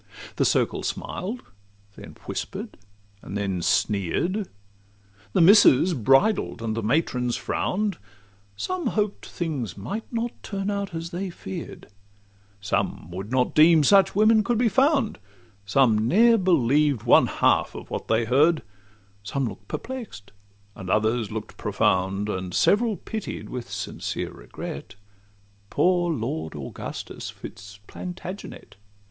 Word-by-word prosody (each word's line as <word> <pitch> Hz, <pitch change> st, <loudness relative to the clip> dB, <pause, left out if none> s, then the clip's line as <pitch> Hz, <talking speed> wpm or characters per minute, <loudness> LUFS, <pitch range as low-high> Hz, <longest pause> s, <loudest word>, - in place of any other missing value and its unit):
The -, -, +2 dB
circle -, -, +1 dB
smiled, 220 Hz, +7 st, -4 dB, 0.5 s
then -, -, -11 dB
whisper'd, -, -, -5 dB, 0.5 s
and 100 Hz, -, -6 dB
then 95 Hz, -3 st, -2 dB
sneer'd; 135 Hz, -, 0 dB, 0.9 s
The -, -, +3 dB
Misses 180 Hz, -3 st, +7 dB
bridled, 135 Hz, -, +2 dB
and 110 Hz, -1 st, -2 dB
the 115 Hz, -, -2 dB
matrons 125 Hz, 0 st, 0 dB
frown'd; 205 Hz, +1 st, -2 dB, 0.6 s
Some 365 Hz, -, -3 dB
hoped 210 Hz, -1 st, -1 dB
things 140 Hz, -, -4 dB
might 200 Hz, -, -6 dB
not 235 Hz, 0 st, -2 dB
turn 200 Hz, 0 st, -3 dB
out 200 Hz, -3 st, -3 dB
as 165 Hz, +1 st, -5 dB
they 190 Hz, +2 st, -3 dB
fear'd; 175 Hz, 0 st, -8 dB, 0.7 s
Some 100 Hz, -4 st, -2 dB
would 95 Hz, +5 st, -6 dB
not 130 Hz, -1 st, +1 dB
deem 155 Hz, 0 st, +6 dB
such 195 Hz, +5 st, +5 dB
women 215 Hz, +1 st, +5 dB
could 240 Hz, +2 st, 0 dB
be 235 Hz, 0 st, +3 dB
found; 270 Hz, -, +2 dB, 0.5 s
Some 110 Hz, -2 st, +3 dB
ne'er 230 Hz, -, +5 dB
believed 145 Hz, -, +2 dB
one -, -, +6 dB
half -, -, +2 dB
of -, -, -9 dB
what -, -, -4 dB
they 115 Hz, +1 st, +2 dB
heard; 150 Hz, +7 st, +3 dB, 0.6 s
Some 130 Hz, +7 st, -2 dB
look'd 100 Hz, -3 st, -9 dB
perplex'd, 210 Hz, -, -7 dB, 0.4 s
and 95 Hz, -2 st, -8 dB
others 110 Hz, +2 st, +1 dB
look'd 110 Hz, -1 st, -6 dB
profound; 95 Hz, +2 st, 0 dB
And 95 Hz, -3 st, -4 dB
several 215 Hz, 0 st, +3 dB
pitied 220 Hz, -2 st, -6 dB
with 125 Hz, -2 st, -6 dB
sincere -, -, -4 dB
regret -, -, -8 dB, 0.7 s
Poor 175 Hz, -1 st, +2 dB
Lord 95 Hz, -, -3 dB
Augustus 70 Hz, -2 st, -7 dB
Fitz 100 Hz, 0 st, -10 dB
Plantagenet. 185 Hz, -, -8 dB
155 Hz, 125 wpm, -25 LUFS, -, 0.9 s, Misses